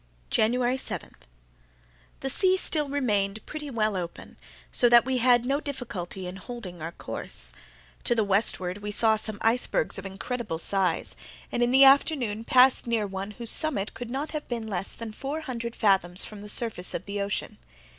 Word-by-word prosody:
January 245 +3 +1
7.—The - - -9
sea 375 +5 +3
still 300 -5 +2
remained 215 -7 -1
pretty 300 -1 -7
well 215 -5 0
open, 175 -2 -6 0.4
so 240 - +5
that 240 0 +6
we 260 -1 0
had 245 0 +4
no 275 +3 0
difficulty 220 - -6
in 180 +1 -7
holding 195 -3 -8
on - - -13
our 165 +2 -5
course. - - -6 0.5
To 240 - +3
the 220 - +2
westward 195 -2 0
we 205 0 -6
saw 220 +1 +4
some 215 -1 -3
icebergs 230 -2 +1
of 195 - -10
incredible 200 -1 -4
size, 185 0 +1 0.4
and 240 - -1
in 240 - +3
the 265 +2 +7
afternoon 265 -6 +3
passed 255 +1 +5
very 235 -1 0
near 215 -2 0
one 195 0 -5
whose 225 +2 +3
summit 240 -10 +3
could 245 -2 -7
not 275 +5 -4
have 305 -1 -5
been 235 -2 -4
less 195 -3 -1
than 230 -1 -7
four 280 +8 -5
hundred 235 -5 -5
fathoms 190 -3 +2
from 210 -2 -10
the 210 - -8
surface 205 -5 +2
of 175 - -5
the 200 0 -4
ocean. 200 0 -4
220 Hz, 180 wpm, -26 LUFS, 195-250 Hz, 0.5 s, the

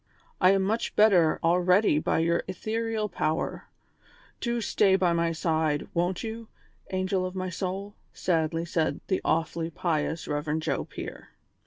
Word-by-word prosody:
I 185 - +7
am 195 -1 +2
much 220 +4 -1
better 185 -7 +5
already 180 0 +4
by - - 0
your 170 +1 +2
ethereal 220 +3 -2
power; 155 -5 -2 0.7
do 235 -1 -1
stay 205 -3 +3
by 180 -3 +2
my 170 0 +1
side, 160 -2 0
won't 175 +1 0
you, 225 0 -6 0.4
angel 185 0 0
of 185 0 -4
my 185 -1 -3
soul 190 +2 -3
V 205 - -25
" - - -40
sadly 165 -1 +1
said 160 -1 0
the 190 - +1
awfully 165 +1 0
pious 160 -1 -2
Rev. 150 +1 -1
Joe 160 - -2
Pier. - - -8
180 Hz, 155 wpm, -27 LUFS, 165-195 Hz, 0.7 s, I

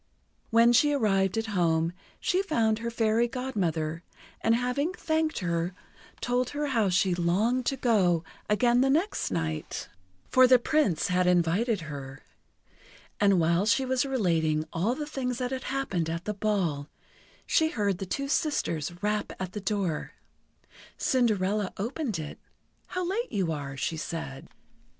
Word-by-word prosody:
When 230 +1 +5
she 290 +5 +4
arrived 195 -6 +2
at 225 - 0
home, 165 -2 +2 0.3
she 370 +1 +1
found 230 - +1
her 235 0 -3
Fairy 230 0 +2
Godmother, 175 - -2 0.4
and 225 - +4
having 250 +8 0
thanked 315 -2 -1
her, 170 0 -1 0.5
told 245 0 0
her 295 - 0
how 225 -6 +2
she 180 +1 +2
longed 205 +9 +1
to 270 - 0
go 185 -10 +2 0.3
again 240 +3 +3
the 270 - +3
next 335 +9 +1
night, 80 -4 -3 0.4
for 255 0 +6
the 255 0 +7
Prince 245 - +1
had 180 0 +2
invited 180 +5 +2
her. 140 -3 -8 1.0
And 200 -3 +4
while 170 +4 +2
she 265 +4 +3
was 255 -1 +1
relating 165 - +1
all 200 +9 0
the 300 - -4
things 255 -4 -3
that 250 0 -2
had 260 0 -4
happened 195 -12 -1
at 165 +2 -4
the 210 - -1
ball, 190 -9 -1 0.6
she 315 0 +3
heard 205 - -1
the 195 - -4
two 275 +9 -2
sisters 175 - 0
rap 210 0 0
at 185 -1 -4
the 210 - -5
door. 195 -5 -2 0.8
Cinderella 210 -5 +1
opened 235 - -2
it. 155 -2 -7 0.5
"How 365 -1 -3
late 455 +7 -2
you 185 -5 0
are," 140 -3 -5
she 160 +5 -2
said. 155 -4 -5
210 Hz, 150 wpm, -28 LUFS, 170-255 Hz, 1.0 s, the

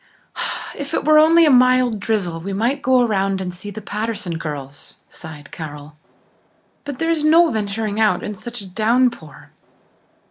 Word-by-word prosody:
"If 285 +3 -5
it - - -2
were 305 0 +6
only 330 +2 +6
a 300 - +4
mild 255 -3 +4
drizzle 200 -6 -2
we 195 +4 -5
might 240 +8 0
go 255 -1 +3
around 195 -4 0
and 180 -1 -4
see 185 +3 -8
the 205 +1 -8
Patterson 205 -5 -4
girls," 145 -3 -8 0.2
sighed 150 -3 -11
Carol. 150 -2 -9 0.9
"But 285 -2 -6
there 325 +3 0
is 320 -2 -1
no 325 +2 +5
venturing 210 0 -2
out 220 -1 +2
in 210 - -4
such 240 +3 -7
a - - -9
downpour. 220 - -1
215 Hz, 165 wpm, -20 LUFS, 180-255 Hz, 0.9 s, were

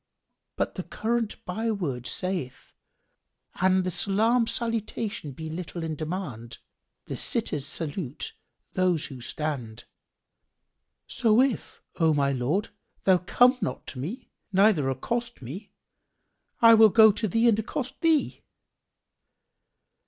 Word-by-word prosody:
But - - -1
the - - -4
current 230 -1 -2
byword 180 - -2
saith, 185 -9 -4 0.9
'An 185 0 +4
the 185 - -2
salam 225 +6 +2
salutation 225 - -2
be 160 +4 -7
little 170 +1 -6
in 160 -1 -3
demand, 145 - -5 0.5
the - - -5
sitters 140 -2 +1
salute 150 -2 -4 0.4
those 180 -4 +1
who 130 -3 -9
stand."[FN#4] 120 -5 -5 1.2
So 225 -2 +2
if, 260 -3 0 0.2
O 160 -2 +4
my 140 -1 +2
lord, 140 - -1 0.3
thou 185 -2 +4
come 245 +8 +4
not 130 - -3
to 130 - -8
me 220 - -6 0.2
neither 190 -8 +4
accost 235 - -3
me, 170 - -8 0.9
I 230 0 +9
will 220 -1 +8
go 220 +1 +7
to 215 +2 -2
thee 225 +5 +2
and 220 -2 +4
accost 260 +4 -4
thee." 320 -3 +2
185 Hz, 120 wpm, -26 LUFS, 150-225 Hz, 1.2 s, I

